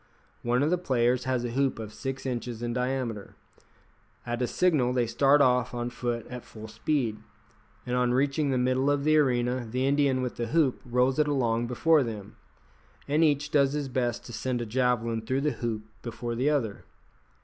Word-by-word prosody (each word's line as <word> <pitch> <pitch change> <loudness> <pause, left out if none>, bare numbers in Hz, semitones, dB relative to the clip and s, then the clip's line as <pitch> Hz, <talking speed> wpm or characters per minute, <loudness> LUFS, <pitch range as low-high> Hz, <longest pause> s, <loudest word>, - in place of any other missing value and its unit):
One 120 +3 +1
of 155 - +1
the 180 - +2
players 125 -5 +1
has 130 -2 0
a 120 - -3
hoop 135 +2 0
of 110 -1 -7
six 135 -1 -5
inches 120 -2 -4
in 120 0 -2
diameter. 125 -4 -3 0.9
At 120 0 -3
a 125 - +1
signal 145 -9 +2
they 125 -1 +2
start 135 +5 +4
off 125 -1 +2
on 120 0 -3
foot 120 -2 -3
at 125 -1 -8
full 110 0 -10
speed, 115 0 -1 0.7
and 125 - -2
on 125 -1 +2
reaching 140 +3 +1
the 130 - +1
middle 130 +2 +1
of 145 -1 +1
the 155 +1 +3
arena 125 -3 +1
the 130 +3 -1
Indian 140 -2 +2
with 125 - -4
the 120 - -2
hoop 145 -1 +1
rolls 125 +3 +2
it 150 - +3
along 120 -5 +1
before 155 +6 +3
them, 110 -5 -5 0.7
and 150 +3 +2
each 145 -1 +1
does 140 -2 +3
his 145 -2 -2
best 120 -2 -2
to 120 - -9
send 125 +3 -2
a 120 - -3
javelin 115 -1 0
through 130 +5 -1
the 150 +1 +1
hoop 110 -3 -3 0.2
before 120 0 -5
the 130 +5 +1
other. 125 -9 -1
125 Hz, 195 wpm, -27 LUFS, 120-140 Hz, 0.9 s, start